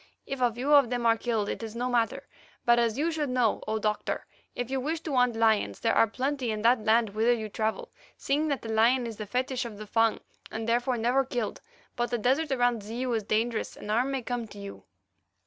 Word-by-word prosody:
If 270 Hz, -1 st, -5 dB
a 245 Hz, -1 st, +4 dB
few 255 Hz, +6 st, 0 dB
of 280 Hz, -5 st, +6 dB
them 245 Hz, -1 st, -2 dB
are 230 Hz, -1 st, +5 dB
killed 225 Hz, -3 st, -1 dB
it -, -, -4 dB
is 225 Hz, 0 st, -6 dB
no 245 Hz, +1 st, -1 dB
matter, 240 Hz, -2 st, 0 dB, 0.4 s
but 240 Hz, 0 st, +5 dB
as 230 Hz, 0 st, +1 dB
you 320 Hz, +4 st, +1 dB
should 305 Hz, -3 st, -2 dB
know, 250 Hz, -4 st, +1 dB
O 220 Hz, -, 0 dB
Doctor, 210 Hz, 0 st, -2 dB, 0.3 s
if 245 Hz, +1 st, -4 dB
you 270 Hz, -, 0 dB
wish 315 Hz, +5 st, -2 dB
to 315 Hz, -3 st, -4 dB
hunt 250 Hz, -2 st, +3 dB
lions 220 Hz, -, +2 dB
there -, -, +1 dB
are 225 Hz, -, +5 dB
plenty 260 Hz, +2 st, -2 dB
in 215 Hz, -1 st, -2 dB
that 235 Hz, -1 st, +4 dB
land 220 Hz, 0 st, +3 dB
whither 225 Hz, +4 st, +3 dB
you 220 Hz, -2 st, -5 dB
travel, 220 Hz, +1 st, -2 dB, 0.3 s
seeing 295 Hz, +3 st, 0 dB
that 280 Hz, -3 st, -2 dB
the 225 Hz, -, -4 dB
lion 240 Hz, +3 st, +3 dB
is 225 Hz, -2 st, -6 dB
the 215 Hz, -, -6 dB
fetish 255 Hz, +3 st, -1 dB
of 230 Hz, -4 st, -7 dB
the 215 Hz, -, -7 dB
Fung 225 Hz, +1 st, +2 dB, 0.3 s
and 220 Hz, 0 st, -5 dB
therefore 245 Hz, +2 st, +1 dB
never 245 Hz, +4 st, +2 dB
killed. 245 Hz, -5 st, -3 dB, 0.3 s
But 240 Hz, 0 st, -1 dB
the 240 Hz, -, 0 dB
desert 265 Hz, +8 st, +1 dB
about 245 Hz, -4 st, +1 dB
Zeu 240 Hz, +4 st, -3 dB
is 225 Hz, -, +1 dB
dangerous 220 Hz, +2 st, -1 dB
and 210 Hz, -, -6 dB
harm 245 Hz, +5 st, +2 dB
may 270 Hz, -2 st, -2 dB
come 240 Hz, -1 st, -3 dB
to 205 Hz, -, -13 dB
you." 200 Hz, 0 st, -9 dB
235 Hz, 235 wpm, -28 LUFS, 220-255 Hz, 0.4 s, of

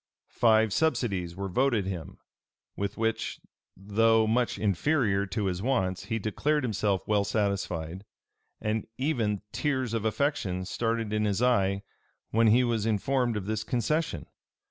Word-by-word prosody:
Five 110 Hz, -2 st, +4 dB
subsidies 100 Hz, -, 0 dB
were 100 Hz, +1 st, -3 dB
voted 115 Hz, +1 st, +1 dB
him; 90 Hz, -5 st, -5 dB, 0.6 s
with 100 Hz, 0 st, -3 dB
which, 115 Hz, 0 st, -1 dB, 0.4 s
though 110 Hz, +3 st, +3 dB
much 120 Hz, +2 st, +1 dB
inferior 105 Hz, -, +1 dB
to 105 Hz, +2 st, -2 dB
his 90 Hz, -1 st, -1 dB
wants, 95 Hz, -7 st, 0 dB
he 115 Hz, -, -1 dB
declared 145 Hz, +8 st, 0 dB
himself 105 Hz, -4 st, 0 dB
well 105 Hz, -1 st, +3 dB
satisfied; 100 Hz, -4 st, -2 dB, 0.6 s
and 110 Hz, 0 st, -2 dB
even 115 Hz, -8 st, 0 dB
tears 130 Hz, -1 st, -1 dB
of 115 Hz, -2 st, -1 dB
affection 110 Hz, -6 st, -1 dB
started 115 Hz, +1 st, -1 dB
in 105 Hz, 0 st, +1 dB
his 105 Hz, +3 st, 0 dB
eye 100 Hz, -5 st, +2 dB, 0.5 s
when 115 Hz, +1 st, +4 dB
he 120 Hz, +4 st, +5 dB
was 115 Hz, -3 st, 0 dB
informed 120 Hz, +2 st, +1 dB
of 100 Hz, -, -4 dB
this 110 Hz, +1 st, -2 dB
concession. 140 Hz, +8 st, -1 dB
110 Hz, 140 wpm, -28 LUFS, 100-120 Hz, 0.6 s, he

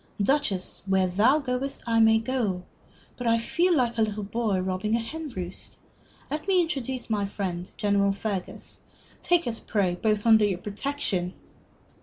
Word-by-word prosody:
"Duchess, 215 Hz, -8 st, 0 dB
where 190 Hz, -1 st, +3 dB
thou 210 Hz, +10 st, +4 dB
goest, 275 Hz, -1 st, -3 dB
I 230 Hz, -1 st, +2 dB
may 220 Hz, 0 st, +6 dB
go. 225 Hz, -6 st, -1 dB, 0.5 s
But 245 Hz, -, -3 dB
I 230 Hz, 0 st, +4 dB
feel 345 Hz, +10 st, +2 dB
like 240 Hz, -4 st, +1 dB
a 215 Hz, -1 st, 0 dB
boy 210 Hz, -1 st, 0 dB
robbing 190 Hz, +4 st, -1 dB
a -, -, +1 dB
hen 310 Hz, +7 st, -5 dB
roost. 185 Hz, -6 st, -7 dB, 0.5 s
Let 300 Hz, +4 st, -3 dB
me 380 Hz, -2 st, +4 dB
introduce 265 Hz, -7 st, -2 dB
my 205 Hz, -3 st, 0 dB
friend, 185 Hz, -3 st, -4 dB
General 200 Hz, -1 st, +2 dB
Fergus. 195 Hz, -2 st, -5 dB, 0.4 s
Take 350 Hz, -1 st, +3 dB
us 230 Hz, -2 st, -3 dB
both, -, -, -23 dB
pray, 190 Hz, -5 st, +1 dB, 0.3 s
under 220 Hz, -2 st, +6 dB
your 195 Hz, -3 st, 0 dB
protection!" 205 Hz, -3 st, -1 dB
220 Hz, 155 wpm, -26 LUFS, 195-260 Hz, 0.5 s, may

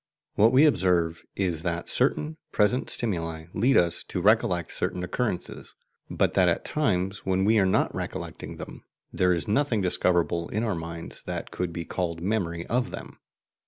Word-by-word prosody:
What 110 Hz, +3 st, +5 dB
we 135 Hz, +4 st, +6 dB
observe 90 Hz, -, +2 dB
is 90 Hz, -5 st, 0 dB
that 85 Hz, -1 st, -3 dB
certain 150 Hz, +4 st, 0 dB
present 110 Hz, +4 st, +2 dB
stimuli 85 Hz, -7 st, -1 dB
lead 125 Hz, +7 st, +3 dB
us 85 Hz, -1 st, +3 dB
to -, -, -4 dB
recollect 90 Hz, -4 st, +2 dB
certain 90 Hz, -, -2 dB
occurrences, 95 Hz, 0 st, -3 dB, 0.3 s
but -, -, +1 dB
that -, -, +4 dB
at -, -, -1 dB
times 95 Hz, -10 st, -1 dB
when 95 Hz, 0 st, +1 dB
we 110 Hz, +1 st, +4 dB
are 95 Hz, -, +3 dB
not 95 Hz, -, +1 dB
recollecting -, -, -6 dB
them, -, -, -9 dB, 0.3 s
there 90 Hz, 0 st, +2 dB
is 85 Hz, -4 st, -1 dB
nothing 115 Hz, +1 st, +1 dB
discoverable 85 Hz, -2 st, +1 dB
in 110 Hz, +3 st, -1 dB
our 110 Hz, -3 st, 0 dB
minds 85 Hz, -1 st, -7 dB
that -, -, -4 dB
could 90 Hz, -1 st, -3 dB
be 85 Hz, 0 st, -5 dB
called 85 Hz, -3 st, -3 dB
memory 85 Hz, -3 st, -2 dB
of 125 Hz, +1 st, 0 dB
them. -, -, -9 dB
90 Hz, 165 wpm, -26 LUFS, 85-110 Hz, 0.3 s, we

